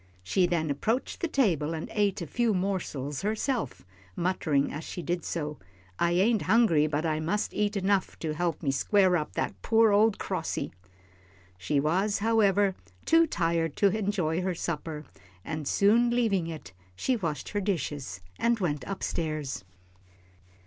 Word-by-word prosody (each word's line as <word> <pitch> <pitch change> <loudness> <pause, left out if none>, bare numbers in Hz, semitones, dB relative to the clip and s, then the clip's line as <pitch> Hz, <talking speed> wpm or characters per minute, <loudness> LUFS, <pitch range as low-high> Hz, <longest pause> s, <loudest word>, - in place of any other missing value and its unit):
She 175 - +2
then 160 -4 0
approached 225 - -1
the 340 - +1
table 165 - +1
and 160 - -5
ate 205 -4 +1
a - - -4
few 230 +5 +1
morsels 170 -8 -2
herself, 220 - -2 0.3
muttering 160 -6 0
as 150 +2 -5
she 175 - -6
did 175 0 -2
so, 150 -3 -4 0.4
"I 170 0 +2
ain't 205 +5 +3
hungry, 190 -8 +4
but 155 +1 -1
I 155 -1 0
mus' 170 +7 -1
eat 210 0 0
enough 195 0 0
to 155 -2 -3
help 170 0 -2
me 140 - +2
square 185 +6 +3
up 155 -3 -2
to - - -21
that - - -3
poor 225 -1 +4
ole 215 +2 +5
crossy." - - -3 0.8
She 95 +11 0
was, 185 +8 +1
however, 205 -3 +3 0.3
too 330 0 +5
tired 165 - 0
to 200 -1 +3
enjoy 190 -6 0
her 185 -1 -1
supper, 155 -2 -4 0.4
and 155 -3 -4
soon 225 +8 +4
leaving 220 -8 +1
it, 155 - -8 0.2
she 260 - 0
washed 165 -9 -3
her 205 - -1
dishes 145 - -3 0.2
and 235 0 +2
went 150 -7 -1
up 195 - -5
stairs. 155 - -3
180 Hz, 160 wpm, -28 LUFS, 155-205 Hz, 0.8 s, ole